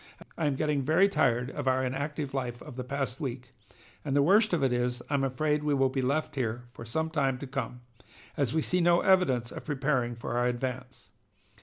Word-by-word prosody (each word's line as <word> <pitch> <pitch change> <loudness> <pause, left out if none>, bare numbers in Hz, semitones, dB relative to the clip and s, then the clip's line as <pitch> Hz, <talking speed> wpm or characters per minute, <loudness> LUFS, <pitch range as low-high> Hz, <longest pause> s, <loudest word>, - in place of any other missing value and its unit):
I 160 - 0
am 140 - +1
getting 150 0 0
very 160 +8 +4
tired 125 -9 +1
of 145 -2 -5
our 130 0 +2
inactive 140 +2 -3
life 125 -3 -3
of - - -10
the 125 - -4
past 135 -1 -3
week, 125 -2 -4 0.5
and 140 -2 -2
the 140 - +5
worst 210 +7 +5
of 170 -5 +1
it 130 -2 +2
is 125 0 -1
I'm 140 -1 +2
afraid 150 +3 0
we 150 -1 +2
will 135 -1 +3
be 130 0 -1
left 140 +5 0
here 120 -3 -2
for 115 - -10
some 160 +8 -2
time 135 -5 +1
to 140 - -7
come, 130 -2 -4 0.5
as 140 -5 0
we 160 0 +1
see 180 0 +1
no 170 0 +4
evidence 135 -11 +3
of - - -7
preparing 135 -4 0
for 120 +1 -3
our 125 - +2
advance. 125 +1 -4
135 Hz, 210 wpm, -29 LUFS, 125-150 Hz, 0.5 s, the